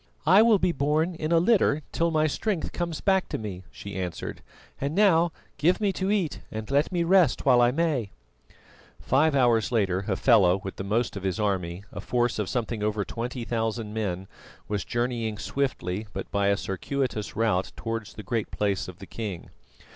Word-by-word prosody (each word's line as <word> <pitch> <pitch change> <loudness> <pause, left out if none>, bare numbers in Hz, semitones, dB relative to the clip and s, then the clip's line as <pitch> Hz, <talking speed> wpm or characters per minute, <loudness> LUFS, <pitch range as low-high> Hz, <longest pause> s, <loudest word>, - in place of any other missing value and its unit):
"I 190 +6 +7
will 225 -2 +6
be 180 - +2
borne 155 +4 +1
in 160 -1 -3
a 170 - +5
litter 165 -5 +3
till 170 0 +1
my 155 -1 +2
strength 180 +4 -1
comes 170 -3 -3
back 190 -1 +2
to - - -2
me," 100 -4 -6
she 100 - -9
answered. 90 -3 -4 0.4
"And 140 +3 -2
now 175 -5 +4 0.3
give 170 +6 +3
me 205 -3 +1
to 190 +1 -2
eat 195 -7 0
and 110 +3 -5
let 145 +5 +2
me 175 -2 +1
rest 175 -5 +3
while 125 -3 +6
I 120 - +5
may." 140 -6 0 0.9
Five 145 +3 +2
hours 120 -4 +3
later, 95 -5 +1
Hafela 100 -2 +4
with 95 0 -7
the - - -4
most 110 +4 0
of 100 - -5
his 95 -1 -2
army, 95 -3 -1
a - - -5
force 120 -2 0
of 105 - -1
something 115 -3 -2
over 105 -1 0
twenty 120 +1 -4
thousand 115 -2 -2
men, 95 -4 -3 0.4
was 105 -2 -2
journeying 120 -3 -2
swiftly 110 -7 -2
but 95 - -6
by 100 -1 +1
a 100 0 +3
circuitous 110 +2 -3
route 105 -4 +1
towards 115 -2 -5
the 105 - -8
Great 115 -3 -2
Place 100 -2 -1
of 90 -2 -9
the 95 - -10
king. 100 -5 -6
120 Hz, 185 wpm, -26 LUFS, 100-155 Hz, 0.9 s, I